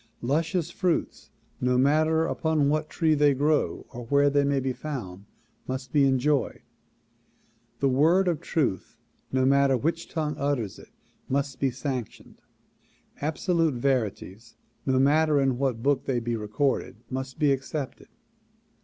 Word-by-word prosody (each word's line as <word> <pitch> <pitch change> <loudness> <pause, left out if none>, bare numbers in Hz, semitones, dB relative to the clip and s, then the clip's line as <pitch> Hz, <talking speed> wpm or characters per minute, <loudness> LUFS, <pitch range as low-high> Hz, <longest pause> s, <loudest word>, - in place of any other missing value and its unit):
Luscious 165 +5 0
fruits 180 -1 -2 0.3
no 125 0 +1
matter 155 +4 +3
upon 160 -3 +1
what 155 +1 0
tree 160 -2 +1
they 145 -2 +3
grow 150 +3 0
or 120 - -7
where 140 +2 +3
they 145 0 +3
may 140 0 +1
be 130 0 -2
found 105 -11 -6 0.4
must 130 0 -5
be 145 -2 +5
enjoyed. 135 +1 +1 1.2
The 140 - +3
word 160 +8 +3
of 170 -4 0
truth 130 - -2 0.3
no 130 0 +2
matter 135 0 +4
w^iich 165 +6 -2
tongue 155 -2 -2
utters 140 -8 -2
it - - -15 0.4
must 140 0 -1
be 135 - +2
sanctioned. 130 -2 -6 0.8
Absolute 160 0 0
verities 115 -4 -2 0.3
no 130 -1 +2
matter 150 +2 +3
in 135 -2 +1
what 125 -4 -1
book 140 -1 +1
they 125 -3 0
be 120 0 -2
recorded 110 +6 -1 0.2
must 130 0 -5
be 150 -3 +3
ac 135 -1 +1
cepted. 140 -1 -6
140 Hz, 145 wpm, -26 LUFS, 130-155 Hz, 1.2 s, be